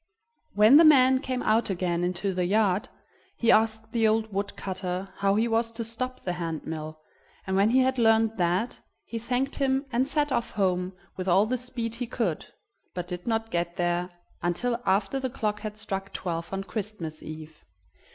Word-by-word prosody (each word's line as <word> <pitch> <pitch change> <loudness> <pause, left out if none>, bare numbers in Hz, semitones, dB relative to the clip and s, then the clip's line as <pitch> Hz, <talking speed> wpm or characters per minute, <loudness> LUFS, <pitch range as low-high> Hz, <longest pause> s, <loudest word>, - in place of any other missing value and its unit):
When 215 +7 +8
the 330 - +8
man 265 -4 +6
came 255 -1 -3
out 220 +1 +2
again 175 -2 -1
into 185 +2 -1
the 180 -1 0
yard, 205 +3 +2 0.5
he 235 - +3
asked 220 0 +2
the 225 -2 +3
old 220 -1 +1
wood 200 +1 -2
cutter 185 0 -4
how 200 0 +2
he 225 +2 +2
was 230 0 +1
to 230 0 -3
stop 255 +3 -4
the 180 - -2
hand 165 -3 -4
mill, 155 -1 -6 0.5
and 190 - -1
when 200 +2 +4
he 260 +3 +4
had 260 0 +1
learned 225 -1 +4
that, 180 +6 0 0.3
he 230 - -5
thanked 250 +4 -1
him 270 0 +1
and 250 +2 +1
set 295 -2 +1
off 235 -2 0
home 185 -2 0 0.2
with 185 0 -4
all 190 +3 +5
the 245 +4 0
speed 245 -2 -4
he 240 +1 -4
could, 220 -9 -2 0.5
but 180 -1 -4
did 180 +2 -6
not 225 0 -1
get 170 0 -1
there 175 0 0 0.3
until 235 +8 -1
after 195 +7 +1
the 260 -1 -2
clock 210 -3 -2
had 215 -1 -6
struck 195 -2 -4
twelve 170 -2 -4
on 195 0 -3
Christmas 190 -5 -5
Eve. 155 0 -10
215 Hz, 190 wpm, -27 LUFS, 180-235 Hz, 0.5 s, When